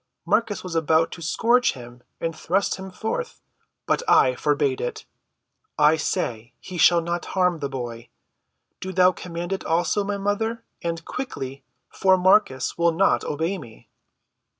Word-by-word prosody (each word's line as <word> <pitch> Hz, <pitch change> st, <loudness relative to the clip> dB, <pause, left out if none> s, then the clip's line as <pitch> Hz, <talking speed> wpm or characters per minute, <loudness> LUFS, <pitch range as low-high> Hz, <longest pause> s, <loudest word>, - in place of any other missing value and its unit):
Marcus 220 Hz, -3 st, 0 dB
was 180 Hz, -2 st, -6 dB
about 160 Hz, 0 st, +2 dB
to 170 Hz, -, -9 dB
scourge 235 Hz, +9 st, +2 dB
him 120 Hz, -1 st, -12 dB, 0.2 s
and 165 Hz, -1 st, -3 dB
thrust 185 Hz, +5 st, 0 dB
him 190 Hz, 0 st, -8 dB
forth, 225 Hz, -, -4 dB, 0.5 s
but -, -, +1 dB
I -, -, +5 dB
forbade 415 Hz, -3 st, 0 dB
it. 460 Hz, -3 st, -4 dB, 0.7 s
I 150 Hz, +1 st, +5 dB
say 120 Hz, -6 st, -3 dB
he 180 Hz, -2 st, -8 dB
shall 170 Hz, +2 st, +6 dB
not 170 Hz, +1 st, -3 dB
harm 180 Hz, -3 st, +2 dB
the 140 Hz, -2 st, -3 dB
boy. 120 Hz, -3 st, -6 dB, 0.7 s
Do 190 Hz, 0 st, -5 dB
thou 185 Hz, 0 st, +5 dB
command 175 Hz, 0 st, -5 dB
it 190 Hz, -, -4 dB
also, 175 Hz, +5 st, +1 dB
my 200 Hz, 0 st, -2 dB
mother—and 205 Hz, -5 st, -3 dB
quickly, 135 Hz, -, -6 dB, 0.2 s
for 190 Hz, -1 st, +3 dB
Marcus 185 Hz, -7 st, +2 dB
will 170 Hz, 0 st, +4 dB
not 190 Hz, +4 st, +2 dB
obey 165 Hz, +6 st, -2 dB
me." 115 Hz, -7 st, -14 dB
175 Hz, 150 wpm, -24 LUFS, 160-200 Hz, 0.7 s, shall